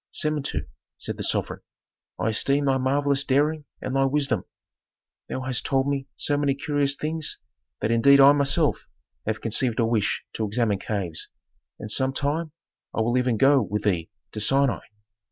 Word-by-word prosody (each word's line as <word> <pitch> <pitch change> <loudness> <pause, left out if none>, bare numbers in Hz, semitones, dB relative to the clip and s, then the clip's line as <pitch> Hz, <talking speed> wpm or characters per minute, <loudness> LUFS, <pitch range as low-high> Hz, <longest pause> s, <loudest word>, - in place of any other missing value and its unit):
"Samentu," 145 - -1 0.3
said - - -4
the - - -6
sovereign, - - -1 0.6
"I 110 - 0
esteem 140 +6 +2
thy 135 -1 +2
marvellous 140 +1 +1
daring 145 +2 +1 0.2
and 130 - -3
thy 135 0 +3
wisdom; 135 -8 0 0.8
thou 130 - -3
hast 130 -2 -1
told 135 0 +1
me 140 -1 -2
so 145 - 0
many 140 -1 +1
curious 145 -1 0
things 155 +1 -2 0.4
that 110 - 0
indeed 140 +5 +6
I 135 +1 +9
myself 145 +2 +1 0.4
have 110 - -2
conceived 115 +1 +1
a 115 - +3
wish 115 -3 0
to 110 - -2
examine 105 -2 0
caves, 95 -7 -3 0.5
and 105 - -6
some 130 +3 +2
time 150 +4 -1 0.4
I - - +1
will 120 +2 +1
even 125 -2 +1
go 135 +3 +5
with 105 0 -3
thee 90 -6 0 0.2
to - - -6
Sinai. 135 +4 +2
135 Hz, 165 wpm, -25 LUFS, 115-145 Hz, 0.8 s, I